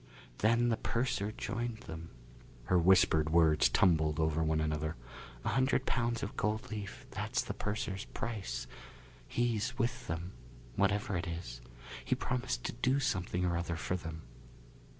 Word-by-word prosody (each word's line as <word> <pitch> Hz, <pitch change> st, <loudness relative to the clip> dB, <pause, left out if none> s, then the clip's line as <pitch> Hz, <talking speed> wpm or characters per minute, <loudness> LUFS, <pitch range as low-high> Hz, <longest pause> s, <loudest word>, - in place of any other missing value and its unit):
Then 115 Hz, +3 st, +4 dB
the 115 Hz, -, +2 dB
purser 115 Hz, -4 st, 0 dB
joined 120 Hz, +1 st, -3 dB
them." 80 Hz, +1 st, -8 dB, 0.5 s
Her 90 Hz, +8 st, +3 dB
whispered 85 Hz, -3 st, +5 dB
words 80 Hz, -2 st, +5 dB
tumbled 80 Hz, -4 st, +3 dB
over 80 Hz, 0 st, +2 dB
one 80 Hz, 0 st, +2 dB
another. 80 Hz, 0 st, -1 dB, 0.5 s
"A -, -, +2 dB
hundred 130 Hz, +1 st, +2 dB
pounds 120 Hz, -2 st, 0 dB
of 100 Hz, -, -4 dB
gold 110 Hz, +1 st, -1 dB
leaf 105 Hz, -2 st, -6 dB
that's -, -, -1 dB
the -, -, -4 dB
purser's 105 Hz, -2 st, -3 dB
price. 110 Hz, -4 st, -4 dB, 0.6 s
He's 120 Hz, 0 st, 0 dB
with 120 Hz, +1 st, -1 dB
them 85 Hz, +1 st, -3 dB, 0.4 s
whatever 100 Hz, 0 st, +1 dB
it 85 Hz, -, -3 dB
is. 85 Hz, -8 st, -5 dB, 0.4 s
He -, -, +1 dB
promised 120 Hz, -, -2 dB
to -, -, -2 dB
do 130 Hz, +2 st, +2 dB
something 90 Hz, -8 st, 0 dB
or 85 Hz, -1 st, +1 dB
other 85 Hz, 0 st, -1 dB
for 90 Hz, +1 st, -2 dB
them." 80 Hz, -3 st, -6 dB
95 Hz, 150 wpm, -33 LUFS, 80-115 Hz, 0.6 s, whispered